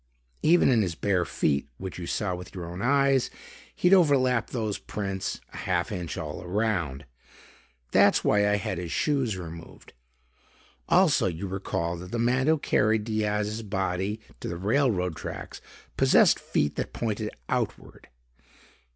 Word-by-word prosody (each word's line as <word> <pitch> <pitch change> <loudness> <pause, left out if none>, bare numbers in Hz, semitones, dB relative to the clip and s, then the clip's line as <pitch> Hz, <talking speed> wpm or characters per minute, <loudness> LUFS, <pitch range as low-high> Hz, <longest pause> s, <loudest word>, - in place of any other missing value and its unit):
Even 170 -1 +5
in 120 -4 +4
his 90 -5 -1
bare 90 -1 +1
feet, 70 -3 0
which 95 -1 -6
you 85 - -5
saw 100 -3 -1
with 90 +2 -8
your 90 -2 -5
own 90 +2 -7
eyes, 135 +1 +3 0.5
he'd 180 +2 +3
overlap 130 - +4
those 110 -5 -2
prints 95 -2 -4
a - - -8
half - - -1
inch 85 -2 -4
all 75 +1 -5
around. 90 -8 -1 0.9
That's - - +5
why 105 -1 +3
I 105 - +3
had 95 -3 -3
his 85 -2 -5
shoes 135 -9 0
removed. 85 -2 -10 1.0
Also, - - +4
you 85 +2 -4
recall 90 -3 -3
that 90 +1 -9
the 115 - -3
man 125 +4 +2
who 160 0 +4
carried 110 -6 +2
Diaz's 105 0 -1
body 95 0 -2 0.2
to - - -6
the 85 - -4
railroad 100 - +1
tracks - - -7 0.4
possessed - - +5
feet 75 0 -1
that - - -3
pointed 110 -2 -2 0.2
outward. - - -3
105 Hz, 150 wpm, -27 LUFS, 90-115 Hz, 1.0 s, Even